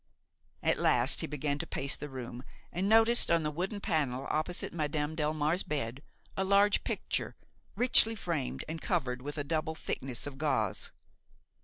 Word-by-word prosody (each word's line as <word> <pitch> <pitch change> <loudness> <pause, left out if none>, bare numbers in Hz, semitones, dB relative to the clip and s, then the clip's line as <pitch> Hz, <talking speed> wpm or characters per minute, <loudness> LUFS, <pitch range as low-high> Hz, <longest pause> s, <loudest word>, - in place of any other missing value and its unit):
At - - +2
last - - +3
he - - -3
began 145 0 -2
to - - -4
pace 135 0 -2
the 150 - -7
room 125 -2 -7 0.3
and 190 +4 -1
noticed, 225 +2 +5
on 170 -1 +3
the 150 - -1
wooden 185 +6 -3
panel 140 -8 -1
opposite 155 +3 -3
Madame 150 -1 -2
Delmare's 155 +2 0
bed, 135 -3 -3 0.3
a 190 - 0
large 200 +1 +3
picture, - - -2 0.4
richly 235 -2 +7
framed 165 - -3
and 160 0 -6
covered 130 -9 -1
with 145 +3 -6
a 145 - -1
double 160 +1 -2
thickness 130 -6 -4
of 140 -1 -8
gauze. 110 -10 -1
155 Hz, 160 wpm, -31 LUFS, 140-175 Hz, 0.4 s, richly